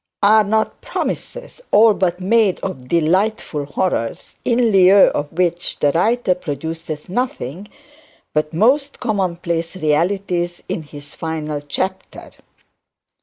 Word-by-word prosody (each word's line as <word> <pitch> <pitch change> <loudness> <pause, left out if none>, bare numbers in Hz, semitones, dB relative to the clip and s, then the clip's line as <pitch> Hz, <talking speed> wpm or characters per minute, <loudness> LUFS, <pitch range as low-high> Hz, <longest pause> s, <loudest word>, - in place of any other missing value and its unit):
Are 215 +2 +6
not 220 +2 -1
promises - - -5
all 220 +1 +6
but 180 -2 -1
made 205 0 +2
of 155 -10 -5
delightful 170 - 0
horrors, 140 -5 -2
in 235 -1 +2
lieu 195 0 +7
of 145 0 -3
which 175 0 -1
the 145 - +2
writer 215 +5 +2
produces 160 -1 -6
nothing 195 - -3 0.7
but 150 0 0 0.5
commonplace 175 -6 -2
realities 175 +2 0
in - - -3
his 145 -1 -11
final 155 -2 -4
chapter? 185 +6 -5
180 Hz, 110 wpm, -19 LUFS, 155-205 Hz, 0.7 s, lieu